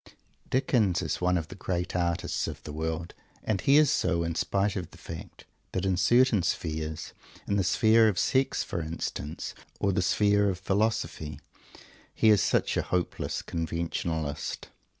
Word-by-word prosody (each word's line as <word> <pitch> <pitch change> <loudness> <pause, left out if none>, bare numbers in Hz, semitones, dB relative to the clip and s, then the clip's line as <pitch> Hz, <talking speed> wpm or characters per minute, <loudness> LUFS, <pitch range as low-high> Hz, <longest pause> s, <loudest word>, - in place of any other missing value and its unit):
Dickens 115 -9 +2
is 80 - -2
one 90 0 +3
of 80 -2 -4
the - - -7
great 90 -2 -3
artists 85 -1 0
of - - -7
the 75 - -7
world, 80 +2 -3 0.3
and 105 -4 0
he 140 +2 +5
is 150 -2 +5
so, 85 -2 +1
in 85 0 -2
spite 100 +4 0
of 90 -4 -4
the - - -16
fact 80 -1 -9 0.3
that 95 0 -1
in 95 -1 +2
certain 120 +3 +4
spheres, 80 -2 -3 0.3
in 100 - 0
the 100 - +2
sphere 110 +4 +5
of 105 -4 +1
Sex, 130 +8 +2
for 85 - -3
instance, 80 -1 -4 0.3
or 100 - +2
the 95 - +1
sphere 100 +3 +3
of 95 - -2
Philosophy, 95 -7 -1 0.8
he 110 - +4
is 105 -3 +6
such - - +1
a - - +3
hopeless 90 -2 -2
conventionalist. 80 -2 -3
90 Hz, 165 wpm, -28 LUFS, 80-105 Hz, 0.8 s, is